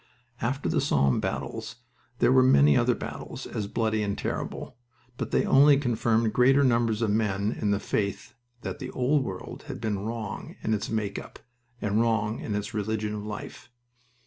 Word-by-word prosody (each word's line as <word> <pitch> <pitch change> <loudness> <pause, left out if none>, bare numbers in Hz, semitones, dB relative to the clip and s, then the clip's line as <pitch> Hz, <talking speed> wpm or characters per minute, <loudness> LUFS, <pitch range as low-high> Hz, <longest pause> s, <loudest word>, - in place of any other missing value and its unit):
After 135 +4 -1
the 160 -3 +1
Somme 70 - +2
battles - - -4 0.4
there - - +4
were 130 0 +6
many 75 - +6
other - - +3
battles - - -7
as 105 -2 -4
bloody 110 0 0
and 100 -1 -2
terrible, - - -4 0.4
but - - -4
they - - +2
only 140 +1 +6
confirmed 115 -4 +1
greater 135 +3 +5
numbers 115 -3 +2
of 110 - +1
men 105 -1 +1
in 105 - -2
the 100 -1 +2
faith 100 -2 -2 0.3
that - - -5
the 130 -3 -5
old 135 +3 +1
world 95 -6 -7
had - - -6
been 110 -3 -1
wrong 110 0 -5
in 110 - +1
its 105 -1 -2
"make 105 -3 -2
up" - - -11 0.5
and 105 +2 +2
wrong 110 -1 +1
in 105 - -3
its 105 0 -3
religion 105 0 -2
of 105 -1 -5
life. 105 +2 -7
110 Hz, 175 wpm, -27 LUFS, 105-125 Hz, 0.5 s, were